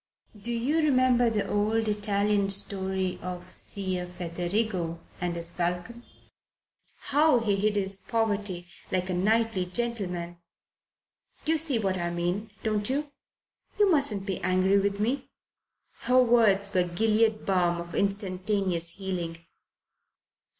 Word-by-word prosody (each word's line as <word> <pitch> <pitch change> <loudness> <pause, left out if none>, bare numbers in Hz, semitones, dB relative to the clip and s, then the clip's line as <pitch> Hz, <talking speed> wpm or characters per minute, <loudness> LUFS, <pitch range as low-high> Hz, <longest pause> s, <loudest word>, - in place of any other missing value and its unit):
Do 235 +4 -3
you 240 +7 0
remember 255 -5 +3
the 215 -2 -1
old 215 +2 +1
Italian 205 -1 +1
story 190 -1 +2
of 180 -1 -5
Ser 185 -3 -3
Federigo 175 0 -2 0.2
and 175 -1 -1
his 170 0 -2
falcon? 180 +7 -3 1.1
How 295 -1 +5
he 210 -3 +1
hid 210 +1 +1
his 195 -1 -1
poverty 205 -3 -2 0.3
like 185 0 0
a - - 0
knightly 210 0 +1
gentleman? 180 -5 -2 1.1
You 320 0 +2
see 295 -5 +2
what 190 -4 -1
I 175 0 -1
mean, 175 +5 -2
don't 210 -1 0
you? 285 +2 -2 0.7
You 410 -2 +4
mustn't 270 - +1
be 190 -2 -3
angry 185 +2 +3
with 200 0 -1
me!" 240 +7 -1 0.7
Her 255 0 +3
words 210 -5 +3
were 185 - +3
Gilead 215 +5 +1
balm 175 -3 +2
of 170 0 -8
instantaneous 190 -3 -1
healing. 180 -4 -4
200 Hz, 125 wpm, -27 LUFS, 180-225 Hz, 1.1 s, How